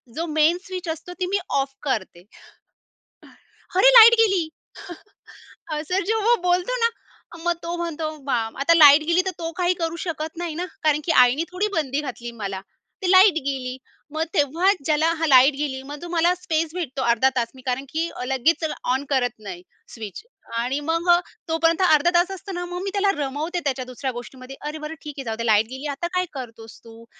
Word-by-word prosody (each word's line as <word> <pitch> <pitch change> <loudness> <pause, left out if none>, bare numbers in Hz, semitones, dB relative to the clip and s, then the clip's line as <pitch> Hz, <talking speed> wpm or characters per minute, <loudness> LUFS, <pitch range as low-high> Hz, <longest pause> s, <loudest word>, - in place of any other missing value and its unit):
जो 330 - -2
main 315 +3 +3
switch 370 -2 -6
असतो, 330 +3 -6
ती 365 - 0
मी 395 +2 0 0.2
ऑफ 270 0 -3
करते. 190 -10 -3 1.5
अरे! 440 +7 +7
लाईट 465 -1 +10
गेली. 390 -7 +3 1.3
असं 365 +6 -1
जेव्हा 445 +3 +2
बोलतो 360 +7 +1
ना. 465 - +4 0.5
मग 345 0 +2
तो 340 +1 -3
म्हणतो 330 -2 -3 0.2
बा 275 - +1 0.2
आता 335 +5 +4
लाईट 295 -2 +8
गेली 340 +2 +3
तर, 380 - -1
तो 330 -1 -4
काही 360 0 +2
करू 330 0 -2
शकत 320 -1 -5
नाही, 345 -3 -4
ना 350 +3 -3 0.2
कारण 300 -1 +3
की 335 - +1
आईने 255 +6 +1
थोडी 370 +4 -1
बंदी 290 -3 -1
घातली 240 -4 -7
मला. 195 -1 -4 0.4
ती 370 -1 +1
लाईट 375 +1 +7
गेली. 255 -2 -3 0.4
मग 315 +1 0
तेव्हाच 335 +6 +2
ज्याला 310 +1 +2
हा 325 - +1
लाईट 270 0 +6
गेली 275 -2 -3
मग 290 +1 -9
तो 345 - -7
मला 345 +1 +2
स्पेस 325 -2 -2
भेटतो 300 -7 -4
अर्धा-तास. 240 +1 +2
मी 260 - -13
कारण 260 +2 -2
की 330 +3 -2 0.2
लगेच 270 +6 +1 0.3
ऑन 265 +2 -1
करत 250 -3 +1
नाही 195 -4 -8 0.3
स्विच. 215 -4 -8 0.4
आणि 250 +4 -1
मग 330 +3 -2
अ, 345 0 +7 0.3
तोपर्यंत 330 +2 +1
अर्धा-तास 345 +2 +3
असतो 385 +1 -8
ना, 355 0 -4
मग 355 +1 -6
मी 395 - -2
त्याला 400 -1 +2
रमवते 300 +5 -3
त्याच्या 260 -2 -1
दुसऱ्या 255 +1 -4
गोष्टीमध्ये. 255 +2 -9
अरे 300 +1 -5
बरं 305 +1 -6
ठीक 300 - -7
आहे. 270 - -5
जाऊ 225 -1 -3
दे, 230 - -3
लाईट 215 -1 +4
गेली, 265 +3 -6
आता 285 +5 -3
काय 365 0 +1
करतोस 230 -4 -9
तू? 230 0 -14
315 Hz, 190 wpm, -23 LUFS, 265-350 Hz, 1.5 s, लाईट